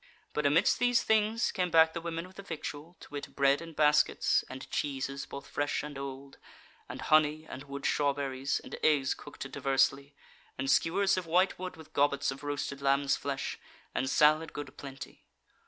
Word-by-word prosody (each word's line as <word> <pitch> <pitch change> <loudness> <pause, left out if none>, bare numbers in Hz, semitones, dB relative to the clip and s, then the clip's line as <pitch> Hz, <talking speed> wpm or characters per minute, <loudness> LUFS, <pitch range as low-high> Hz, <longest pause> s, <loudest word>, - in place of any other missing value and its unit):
But 150 -1 +1
amidst 165 +8 +3
these 245 -1 +3
things 220 +1 +2
came 180 -1 -1
back 160 -1 +5
the 165 - -4
women 165 0 -4
with 185 +1 -16
the - - -6
victual; 165 -2 -7
to - - -12
wit 145 -1 -7
bread 140 +1 +3
in 165 -1 -9
baskets, 150 0 +3
and 130 +1 -8
cheeses 140 -1 -2
both 140 0 -8
fresh 145 0 -2
and 150 -1 -7
old, 135 0 -7 0.5
and - - -6
honey, 155 0 +3
and 135 +2 -8
wood 140 0 -7
strawberries, 140 -2 0
and - - -7
eggs 140 -4 +3
cooked - - -9
diversely, 140 +1 +1 0.4
and 135 +1 0
skewers 190 +6 +3
of 180 -2 -3
white 180 +4 +2
wood 185 -2 -6
with 160 - -14
gobbets 140 -1 +2
of 135 +1 -9
roasted 145 -1 -3
lamb's 140 0 +2
flesh, 140 -1 -4 0.3
and 130 - -1
salad 155 +2 +4
good 145 -2 -7
plenty. 135 -1 -10
145 Hz, 175 wpm, -30 LUFS, 140-165 Hz, 0.5 s, back